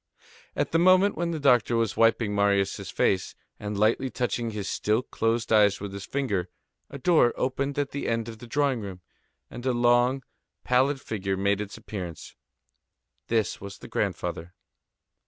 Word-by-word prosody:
At -, -, -1 dB
the 165 Hz, -, +3 dB
moment 185 Hz, +3 st, +5 dB
when 170 Hz, 0 st, -1 dB
the 165 Hz, -2 st, -3 dB
doctor 125 Hz, -4 st, +3 dB
was 115 Hz, -2 st, 0 dB
wiping 115 Hz, -2 st, +3 dB
Marius' 100 Hz, -1 st, +1 dB
face, 95 Hz, -2 st, 0 dB, 0.2 s
and 105 Hz, 0 st, -4 dB
lightly 115 Hz, +5 st, +2 dB
touching 120 Hz, -2 st, -2 dB
his 105 Hz, -3 st, -5 dB
still 110 Hz, +4 st, 0 dB
closed 115 Hz, -1 st, -1 dB
eyes 105 Hz, -2 st, +4 dB
with 100 Hz, -1 st, -6 dB
his 100 Hz, 0 st, -6 dB
finger, 105 Hz, -11 st, -1 dB, 0.4 s
a 140 Hz, -, -7 dB
door 140 Hz, -4 st, +4 dB
opened 140 Hz, +2 st, -1 dB
at 145 Hz, -1 st, -1 dB
the 140 Hz, -, -4 dB
end 115 Hz, -1 st, -1 dB
of 110 Hz, -1 st, -8 dB
the 120 Hz, -, -10 dB
drawing 135 Hz, -1 st, +1 dB
room, 95 Hz, -3 st, -7 dB, 0.5 s
and 120 Hz, -, -8 dB
a 130 Hz, -, +2 dB
long, 120 Hz, +2 st, +3 dB, 0.4 s
pallid 130 Hz, +3 st, +2 dB
figure 100 Hz, -5 st, -3 dB
made 100 Hz, +1 st, +1 dB
its 105 Hz, 0 st, -7 dB
appearance. 90 Hz, -6 st, -7 dB, 0.9 s
This 115 Hz, -2 st, 0 dB
was 100 Hz, -1 st, -8 dB
the -, -, -11 dB
grandfather. 90 Hz, -2 st, -3 dB
115 Hz, 165 wpm, -26 LUFS, 100-130 Hz, 0.9 s, moment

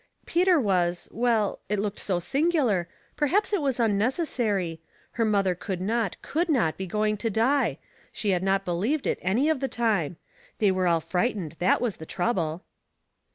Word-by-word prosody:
" -, -, -39 dB
Peter 355 Hz, -1 st, +3 dB
was 180 Hz, -6 st, 0 dB
— -, -, -27 dB
well, 225 Hz, -3 st, +1 dB
it 210 Hz, -, +1 dB
looked 200 Hz, 0 st, -2 dB
so 185 Hz, -3 st, 0 dB
singular 265 Hz, -, +1 dB, 0.2 s
— -, -, -36 dB
perhaps 385 Hz, +9 st, +1 dB
it 400 Hz, -, +2 dB
was 270 Hz, -3 st, 0 dB
unnecessary 215 Hz, -, 0 dB, 0.3 s
—her 230 Hz, -, -1 dB
mother 200 Hz, -3 st, +2 dB
could 180 Hz, +1 st, -5 dB
not, 215 Hz, +1 st, -1 dB
could 335 Hz, +3 st, -1 dB
not 225 Hz, -, +2 dB
be 190 Hz, -, -5 dB
going 215 Hz, +3 st, 0 dB
to 225 Hz, +2 st, -2 dB
die; 240 Hz, +7 st, +2 dB, 0.3 s
she 205 Hz, -, -1 dB
had 180 Hz, -2 st, +1 dB
not 195 Hz, +1 st, +1 dB
be 180 Hz, -, -2 dB
lieved 235 Hz, -, 0 dB
it -, -, 0 dB
any 215 Hz, +11 st, +1 dB
of 315 Hz, -3 st, +1 dB
the 270 Hz, -, -1 dB
time. 205 Hz, -, 0 dB, 0.4 s
They 205 Hz, -3 st, +3 dB
were 185 Hz, -1 st, +1 dB
all 165 Hz, -1 st, +3 dB
fright 200 Hz, +8 st, 0 dB
ened, 165 Hz, -5 st, -5 dB
that 180 Hz, -, +3 dB
was 235 Hz, -6 st, -1 dB
the 160 Hz, -, -10 dB
trouble." 175 Hz, -4 st, -1 dB
210 Hz, 195 wpm, -26 LUFS, 180-250 Hz, 0.4 s, Peter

